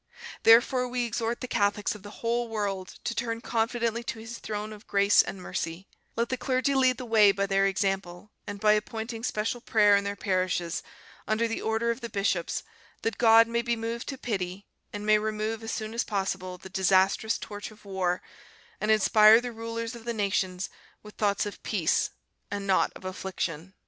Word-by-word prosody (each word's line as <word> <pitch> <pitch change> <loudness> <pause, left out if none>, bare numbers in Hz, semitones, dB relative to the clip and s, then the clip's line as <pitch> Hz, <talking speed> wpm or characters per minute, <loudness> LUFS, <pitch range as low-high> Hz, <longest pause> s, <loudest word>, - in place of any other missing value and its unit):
Therefore 245 +3 +5
we 245 0 -1
exhort 230 +1 -2
the 255 - -4
Catholics 205 -3 +1
of 210 - -11
the 205 - -10 0.2
whole 235 +1 +1
world 200 -4 -3
to 230 - -2
turn 230 0 -2
confidently 230 0 -1
to - - -4
His 225 +1 -8
throne 215 0 -5
of 210 0 -14
grace 200 0 +5
and 195 - -6
mercy; 170 +1 -4 0.3
let 235 +1 0
the 255 - -1
clergy 255 +2 0
lead 260 -2 +3
the 250 - -6
way 215 -3 +6
by 200 0 -1
their 195 0 +2
example 195 0 -2 0.2
and 205 -1 -5
by 210 0 +5
appointing 225 +2 -3
special 225 +1 -2
prayer 210 -4 +4
in 200 - +2
their 200 0 -3
parishes, 185 -3 -1 0.5
under 220 +2 +1
the 225 - -3
order 225 +1 0
of 235 +3 -5
the 235 - -5
bishops, 195 -4 -1 0.4
that 225 - -2
God 225 -1 +7
may 235 0 0
be 235 0 0
moved 230 +1 -4
to 270 - -4
pity, 195 -5 -3 0.3
and 205 0 -6
may 215 0 +5
remove 215 +1 -2
as 225 0 -5
soon 215 0 -4
as 235 - 0
possible 190 -3 -3
the 190 - -11
disastrous 190 +3 +2
torch 205 -1 -7
of 210 -1 -18
war 185 -2 -1 0.6
and 210 - -2
inspire 215 +1 +7
the 245 0 -5
rulers 230 +1 -5
of 235 -1 -11
the 235 -1 -2
nations 190 -3 -1 0.3
with 210 0 -12
thoughts 205 -1 0
of 205 - -7
peace 180 -7 +1 0.4
and 200 -1 -4
not 190 -1 +2
of - - -12
affliction." 185 -2 -4
215 Hz, 190 wpm, -28 LUFS, 195-230 Hz, 0.6 s, God